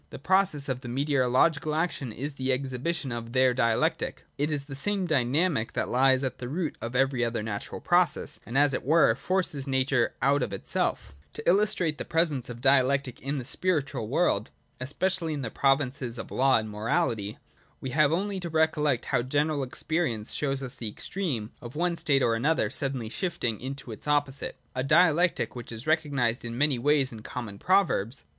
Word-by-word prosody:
The - - -8
process 175 -3 +1
of 130 -1 -3
meteorological 140 +4 +1
action 155 -6 -1
is 140 +7 -5
the 130 -1 -1
exhibition 135 +3 -2
of 115 0 -5
their 130 -1 +4
Dialectic. 115 -3 0
It 145 +2 -1
is 145 -2 -2
the 140 0 -9
same 195 +7 +1
dynamic 145 -3 +1
that - - -1
lies 130 +1 +3
at 130 - -3
the 120 - -5
root 160 +1 -2
of 115 +2 -5
every 130 -1 +2
other 115 -2 -1
natural 105 -2 -5
process, - - +1
and, 120 +5 -3
as 145 -1 +4
it - - -2
were, 155 -3 +4
forces 145 0 -1
nature 130 -2 +1
out 140 +3 +3
of 105 - -2
itself 95 -7 -2 0.2
To 150 - -8
illustrate 180 -4 +2
the - - -2
presence 155 -7 0
of 120 -1 -8
Dialectic 135 -1 +3
in 140 +2 -2
the 130 - -4
spiritual 140 -6 -1
world, 120 - +1 0.3
especially 160 +5 -1
in 140 - -4
the 115 - -4
provinces 135 -3 +1
of 115 - -7
law 135 0 +4
and 110 -1 -2
mo 105 0 -8
rahty, 110 -4 0 0.4
we 130 - -5
have 150 +1 +3
only 195 +3 -1
to 175 -2 -5
recollect 150 -5 +1
how 125 - +4
general 145 +3 0
experience 130 -4 -2
shows 135 -2 -1
us 130 -1 -3
the 115 -3 -5
extreme 125 - -3
of 120 +2 -9
one 175 +2 0
state 140 -5 +2
or 115 - +2
action 150 +8 +1
suddenly 135 -5 -2
shift 175 - -4
ing 115 -4 0
into 135 -1 -6
its 110 - -10
opposite: 145 -2 0 0.2
a 130 - -2
Dialectic 165 +3 +3
which 120 -1 -7
is 115 +1 -6
recognised 145 -7 +1
in 115 0 -5
many 140 -2 +2
ways 145 0 +2
in 110 -2 -9
common 110 -3 -7
proverbs. 170 - +1
135 Hz, 185 wpm, -27 LUFS, 120-155 Hz, 0.4 s, their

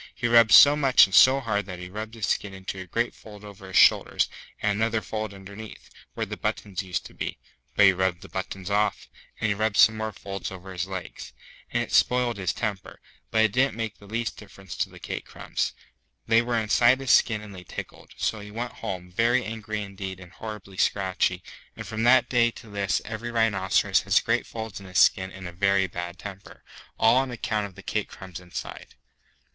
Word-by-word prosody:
He 120 - -1
rubbed 115 -1 +6
so 145 +1 +9
much 135 -3 +6
and 95 - -10
so 130 +7 +7
hard 105 -4 -1
that 90 -1 -6
he 90 0 -8
rubbed 110 +4 -7
his 110 -3 -2
skin 100 -1 -1
into 95 0 -6
a 95 - -8
great 115 +6 -1
fold 105 -2 -13
over 100 -2 -11
his 95 - -1
shoulders, - - +4 0.3
and 105 - +1
another 110 0 +1
fold 110 +1 -4
underneath, 100 +2 -11 0.2
where - - -2
the - - -6
buttons 100 -3 -3
used 95 -2 -4
to - - -11
be - - -5 0.4
(but 100 - +6
he 95 - +7
rubbed 90 -1 -1
the - - -10
buttons 95 +1 -5
off), 105 +1 0 0.3
and 110 - 0
he - - +2
rubbed 105 0 -1
some 110 -1 +6
more 110 0 -3
folds 100 0 -6
over 95 0 -9
his 90 +1 -3
legs. 95 -2 -7 0.4
And - - 0
it - - -9
spoiled 125 -2 +3
his 95 -3 -1
temper, 105 -5 -5 0.3
but 110 -1 +3
it 110 - +1
didn't 130 +2 +1
make 115 -2 -4
the 100 - -15
least 115 +3 -3
difference 95 -3 -11
to - - -1
the - - -14
cake - - -5
crumbs. - - -3 0.5
They 115 +1 +4
were 120 0 -1
inside 120 +3 +4
his 135 -2 0
skin 110 -3 +4
and 105 -1 -10
they 90 -1 -10
tickled. - - -9
So 110 - -1
he 105 0 -9
went 120 +3 -4
home, 90 -1 -6
very 120 +6 +2
angry 110 -1 -4
indeed 95 -1 -7
and 90 -2 -13
horribly 105 -3 -9
scratchy; 95 -2 0 0.3
and - - -7
from 110 0 -4
that 130 +2 +6
day 120 -2 +3
to 115 -2 -13
this 100 -1 -1
every 115 +2 -5
rhinoceros 110 -5 +2
has - - +3
great - - 0
folds 110 -3 -6
in 95 - -12
his 90 - -4
skin 95 0 +4
and 95 -1 -8
a - - -7
very 100 +2 +2
bad 85 -1 -6
temper, 100 -1 -10 0.3
all 115 +2 +5
on 135 0 +1
account 110 -3 -2
of 95 - -17
the 100 - -12
cake 105 -1 -2
crumbs 95 -3 -9
inside. 90 -1 -8
105 Hz, 215 wpm, -26 LUFS, 95-115 Hz, 0.5 s, so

